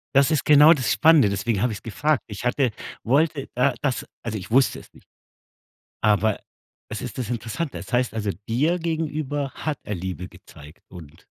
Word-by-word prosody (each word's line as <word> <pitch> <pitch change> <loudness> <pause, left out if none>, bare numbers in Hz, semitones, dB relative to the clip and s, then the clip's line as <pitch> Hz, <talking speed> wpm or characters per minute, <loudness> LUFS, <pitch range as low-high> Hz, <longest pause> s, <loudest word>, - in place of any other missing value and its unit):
Das 140 +2 +5
ist 155 - +1
genau 150 +2 +8
das 130 -5 0
Spannende, 155 -9 +5
deswegen 100 0 -1
habe 125 - +1
ich's 105 - -7
gefragt. 140 +7 0
Ich 105 +2 -8
hatte 125 0 +1 0.3
wollte 145 +3 +1
da 125 +3 +2
das 135 -4 -1 0.2
also, 115 -2 -4
ich 95 - -10
wusste 130 +3 +3
es - - -18
nicht. - - -20 0.9
Aber 105 0 +2 0.5
es - - -6
ist - - -7
das 120 -3 -3
Interessante. 120 +6 -4
Es - - -10
heißt, 125 -2 +1
also, 105 -2 -2 0.2
dir 150 +10 +1
gegenüber 155 -4 -2
hat 155 -3 -3
er 105 - -4
Liebe 90 0 -5
gezeigt 75 +2 -16
und 80 -4 -13
125 Hz, 180 wpm, -23 LUFS, 105-150 Hz, 0.9 s, genau